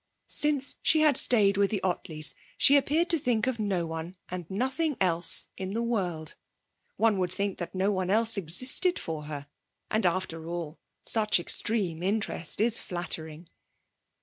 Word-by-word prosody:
Since 290 -2 0
she 315 - +3
had 305 -3 +4
stayed 205 -6 +4
with 200 -1 +2
the 210 - -1
Ottleys, 160 -4 -1 0.2
she 280 - +5
appeared 300 +5 +2
to 330 - +3
think 245 -5 0
of 255 -3 -2
no 195 -5 -1
one 165 +3 -7
and 180 -2 -7
nothing 265 - -1
else 175 -2 +3
in 190 +1 -5
the 230 +2 -2
world. 180 -9 -3 0.6
One 215 -2 +2
would 180 -1 -1
think 200 +1 -3
that 175 +1 -6
no 190 +2 +1
one 185 -2 -2
else 225 +3 +3
existed 255 - +1
for 155 -2 -5
her. 145 -2 -6 0.5
And, 220 0 +1
after 170 -3 -2
all, 170 -2 -6 0.3
such 215 -4 +3
extreme 175 -2 +1
interest 195 -4 -1
is 225 +1 +4
flattering. 170 -2 -5
195 Hz, 160 wpm, -27 LUFS, 170-230 Hz, 0.6 s, she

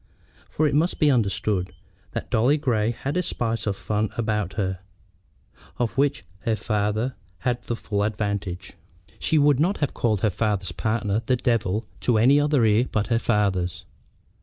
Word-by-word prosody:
For 155 - 0
it 145 - -1
must 160 +5 +2
be 150 -2 +4
understood 100 -5 0 0.4
that - - -5
Dolly 125 +7 +3
Grey 115 -7 +1
had 135 +5 -3
a - - +3
spice 115 -10 -2
of 100 - 0
fun 105 +1 -1
about 105 -5 -1
her, 95 -3 -2 1.0
of 120 -2 -1
which 140 +2 +1
her 115 +1 0
father 110 +3 -1 0.3
had 120 +3 0
the 120 - -2
full 105 -2 -2
advantage. 100 -3 -2 0.5
She 160 - +1
would 145 -2 +4
not 180 +6 +2
have 145 - -1
called 110 -5 0
her 110 - +2
father's 100 -2 -1
partner 110 +1 -1
the 130 +3 +2
"Devil" 115 -4 0
to 120 -3 +2
any 130 +6 +5
other 145 -5 +3
ear 110 +4 +3
but 105 +2 0
her 115 -1 +2
father's. 95 -8 0
110 Hz, 165 wpm, -24 LUFS, 105-130 Hz, 1.0 s, any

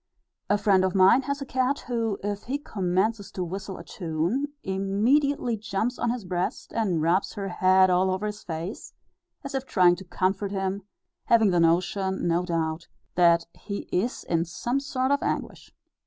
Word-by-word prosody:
A 205 - +4
friend 200 -2 +3
of 185 0 0
mine 195 +7 +6
has 280 0 -1
a - - -8
cat, 260 +2 0
who, 230 -4 -2
if 205 0 -3
he 270 +4 -1
commences 200 -3 -1
to 185 - -2
whistle 190 +2 -5
a - - -9
tune, 175 - -2 0.2
immediately 225 +7 +1
jumps 215 +3 -2
on 235 - 0
his 235 -4 -3
breast, 180 0 -3
and 190 -9 0
rubs 175 +4 +1
her 195 -1 -4
head 185 +1 +4
all 185 +1 +3
over 190 +3 -1
his 210 0 -4
face, 170 +5 -6 0.5
as 275 0 -6
if 270 0 -3
trying 180 -2 +4
to 190 - -9
comfort 190 +2 -1
him, 195 0 -2 0.4
having 225 -4 +4
the 175 - +2
notion, 185 +3 +1
no 170 +1 +2
doubt, 165 -2 -2 0.3
that 170 -1 +4
he 200 -1 -6
is 225 +8 -1
in 165 -1 0
some 240 +10 -2
sort 265 -1 -1
of 285 - +2
anguish. - - -3
195 Hz, 175 wpm, -26 LUFS, 180-230 Hz, 0.5 s, mine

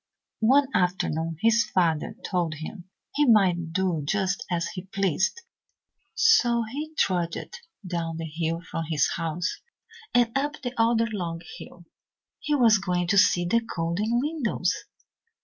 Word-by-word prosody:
"One 275 +2 +5
afternoon 165 -3 0
his 230 +1 +4
father 170 +1 0
told 175 -4 -1
him 170 +4 -8 0.3
he 295 -1 +2
might 180 -7 +3
do 180 -3 0
just 195 +5 -1
as 170 -2 -1
he 180 0 -7
pleased, 195 - 0 0.7
so 240 - +4
he 295 +8 -6
trudged 175 - -1 0.3
down 170 -2 -3
the 165 - -4
hill 165 +1 -3
from 165 -1 -5
his 155 -3 +2
house 165 +2 -3 0.5
and 240 -1 +2
up 290 +2 -1
the 245 -1 -3
other 230 0 +3
long 175 -7 -4 0.2
hill. 175 -1 -12 0.5
He 300 - 0
was 230 -6 +5
going 180 -2 -1
to 200 - +3
see 175 -1 +4
the 230 +7 +2
golden 205 +4 -1
windows. 290 -4 -1
185 Hz, 140 wpm, -26 LUFS, 170-230 Hz, 0.7 s, One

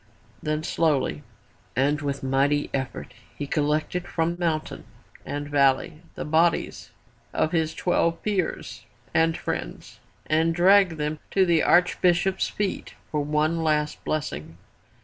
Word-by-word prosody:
Then 155 0 -2
slowly 145 - 0 0.5
and 145 +4 +1
with 140 -2 -3
mighty 140 +2 +1
effort 130 -2 -4 0.2
he 145 - -3
collected 155 +4 -1
from 165 +1 -1
mountain 160 -3 -2 0.4
and 145 0 -4
valley 140 +1 +2
the - - -5
bodies 160 +2 +1 0.5
of 155 - +1
his 160 -2 0
twelve 170 -2 0
peers 200 -5 -2 0.3
and 165 0 +3
friends - - -5 0.3
and 165 +1 +2
dragged 185 -1 +5
them 150 0 -2
to 190 -1 +3
the 170 -3 +3
Archbishop's 180 +1 +3
feet 205 -2 -3 0.2
for 150 -1 0
one 155 +3 0
last 150 -1 0
blessing. 80 - -4
155 Hz, 125 wpm, -25 LUFS, 145-170 Hz, 0.5 s, dragged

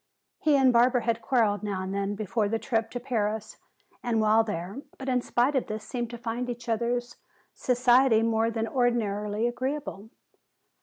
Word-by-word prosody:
He 300 -2 +3
and 260 -2 +4
Barbara 245 +1 +4
had 230 0 0
quarreled 220 -6 +1
now 200 -3 -3
and 190 +1 -4
then 200 +1 -1
before 210 +1 -1
the 225 - 0
trip 225 -1 -1
to 245 - -5
Paris 220 -4 -2 0.4
and 235 -2 0
while 220 +1 +4
there, 200 +3 -5 0.2
but 265 - -8
in 250 -1 +2
spite 250 +4 +1
of 265 - 0
this 215 0 -5
seemed 240 +1 -4
to 240 - -7
find 240 +2 -4
each 240 0 -6
other's 240 +1 -1 0.4
society 245 -2 +3
more 225 0 +2
than 225 0 -2
ordinarily 220 -3 0
agreeable. 255 -4 -4
230 Hz, 170 wpm, -27 LUFS, 215-245 Hz, 0.4 s, and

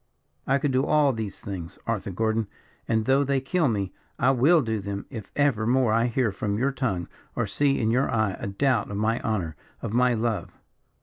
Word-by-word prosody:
I 135 - +4
could 140 0 0
do 130 +1 +2
all 150 -2 +3
these 110 -4 -5
things, 95 -3 -7
Arthur 115 -2 -2
Gordon, 110 +3 0 0.4
and, 110 -1 +1
though 135 +3 +4
they 140 0 +1
kill 155 +4 +1
me, 100 -5 -1 0.2
I 135 0 +4
will 145 +5 +4
do 110 -2 -1
them, 100 0 -5
if 110 -6 -7
ever 130 -7 +2
more 125 -2 +3
I 115 +2 +3
hear 120 -2 +1
from 100 +1 -2
your 135 +5 +1
tongue 95 -11 -2 0.3
or - - 0
see 140 -1 +1
in 110 -1 +1
your 130 +4 +2
eye 110 -4 +1
a - - -4
doubt 115 +3 +1
of 100 - -4
my 110 +3 +1
honour 95 -9 -2 0.3
of 105 - -3
my 125 0 +3
love. 115 -1 -2
115 Hz, 205 wpm, -26 LUFS, 105-135 Hz, 0.4 s, I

